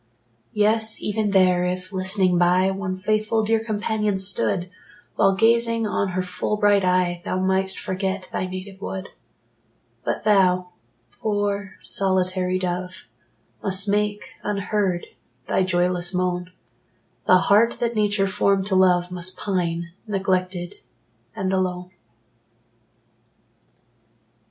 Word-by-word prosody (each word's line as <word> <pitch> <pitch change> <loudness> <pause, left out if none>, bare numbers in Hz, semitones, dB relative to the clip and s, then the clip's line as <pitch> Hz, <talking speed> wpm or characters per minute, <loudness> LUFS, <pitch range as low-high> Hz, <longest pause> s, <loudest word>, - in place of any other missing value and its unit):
Yes, 220 +1 +2
even 210 0 -1
there, 185 -2 +4
if, 185 +1 -3
listening 185 -1 +1
by, 180 +2 +3
One 190 -1 -3
faithful 215 +3 0
dear 225 +1 +1
companion 215 -2 -1
stood, 185 - +1 0.5
While 195 - +3
gazing 230 +2 +2
on 200 -1 0
her 185 0 -1
full 180 +3 -2
bright 205 -1 +3
eye, 180 -1 +1
Thou 185 - -2
mightst 190 0 +1
forget 190 0 -3
thy 185 - -2
native 190 +1 -8
wood 190 -1 -5 0.9
But - - -2
thou, 185 -3 +3 0.5
poor 205 -2 -2
solitary 185 -1 0
dove, 180 +1 -4 0.6
Must 190 0 +1
make, 210 0 0 0.2
unheard, 200 -3 -1 0.4
thy - - +1
joyless 180 0 +1
moan; 180 0 -1 0.8
The 185 - +7
heart 210 +5 +4
that 235 -1 0
Nature 205 -2 +2
formed 195 -1 +1
to 195 -1 0
love 180 -1 +3
Must 180 +1 -2
pine, 170 -3 -2 0.2
neglected, 185 -3 -1 0.6
and 190 0 -2
alone. 180 -1 -2
190 Hz, 115 wpm, -23 LUFS, 180-205 Hz, 0.9 s, The